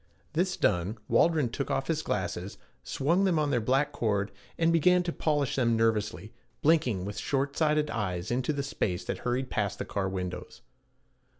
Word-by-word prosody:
This 180 +3 0
done, 90 +6 +1
Waldron 155 -7 +3
took 135 +4 -4
off 135 - 0
his 160 0 0
glasses, 95 - -3 0.3
swung 170 +8 +1
them 185 -4 +2
on 150 -2 +1
their 120 -3 +2
black 135 +5 +2
cord, 100 -2 0 0.3
and 165 0 +3
began 180 +2 +4
to 170 -1 -3
polish 145 -4 0
them 115 -3 +3
nervously, 105 -4 0 0.3
blinking 130 - +3
with 105 0 -5
short 140 0 -1
sighted 150 -1 +2
eyes 95 -5 -2
into 125 +4 0
the 140 -2 -2
space 100 - -2
that - - -3
hurried 125 +1 -2
past 100 -2 -1
the - - -4
car 95 -2 -2
windows. 90 -1 -5
130 Hz, 175 wpm, -29 LUFS, 105-155 Hz, 0.3 s, began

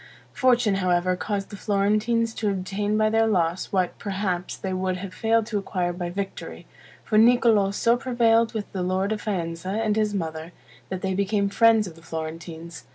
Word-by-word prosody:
Fortune, 245 -5 +3
however, 180 -1 +1
caused 200 +1 -3
the - - -6
Florentines 215 +3 +1
to 215 -2 -1
obtain 200 +2 -1
by 215 0 +2
their 225 0 +3
loss, 175 -4 0
what, 185 -2 0
perhaps, 190 -3 -3
they 190 -1 -4
would 185 0 -1
have 185 0 -7
failed 225 +2 +1
to 215 -2 -2
acquire 180 -3 -2
by 175 0 -4
victory; 195 +2 -6 0.4
for 215 -1 +2
Niccolo 230 -3 +5
so 230 +4 +2
prevailed 230 -2 +2
with 210 -2 -4
the 190 - -3
lord 185 +3 0
of 215 -1 -2
Faenza 170 -3 -3
and 215 +1 0
his 215 -1 0
mother, 160 -2 -4 0.4
that 185 -1 -5
they 190 0 0
became 200 +1 0
friends 225 0 +4
of 180 - -8
the 165 - -16
Florentines. 165 0 -7
200 Hz, 180 wpm, -24 LUFS, 180-220 Hz, 0.4 s, Niccolo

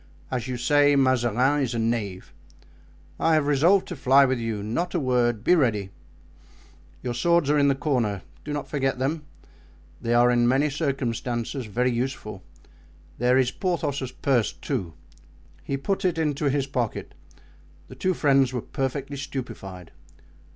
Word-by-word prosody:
As 125 -2 -2
you 125 -1 -3
say, 145 +3 +4
Mazarin 130 +1 +2
is 125 -3 -1
a - - -1
knave. 110 -5 -2 0.9
I 165 -1 +3
have 155 -2 +2
resolved 160 +7 +3
to 180 - -4
fly 135 0 +5
with 130 -2 0
you, 110 -3 -3
not 170 - -2
a - - +2
word—be 125 0 +2
ready. 110 - +1 1.1
Your 125 -1 -2
swords 170 +3 +2
are 150 - +3
in 140 - +4
the 140 - +3
corner; 120 - -1 0.2
do 150 - -6
not 145 -1 -3
forget 135 -3 -1
them, 145 +4 -2 0.8
they 115 0 0
are 120 +1 +5
in 120 -1 +3
many 135 +4 +2
circumstances 125 -3 -2
very 125 +5 0
useful; 120 -5 -4 0.8
there 125 +2 +3
is 130 -1 +2
Porthos's 145 -8 -2
purse, 130 -5 +1
too." 85 -3 -4 0.7
He 140 - -2
put 195 +8 -2
it 180 -3 +1
into 150 -2 -1
his 140 -1 +1
pocket. 125 -5 -3 0.7
The - - -11
two 185 -1 -1
friends 135 -4 +3
were 125 - -2
perfectly 135 +1 -3
stupefied. 100 - -7
130 Hz, 150 wpm, -25 LUFS, 120-145 Hz, 1.1 s, fly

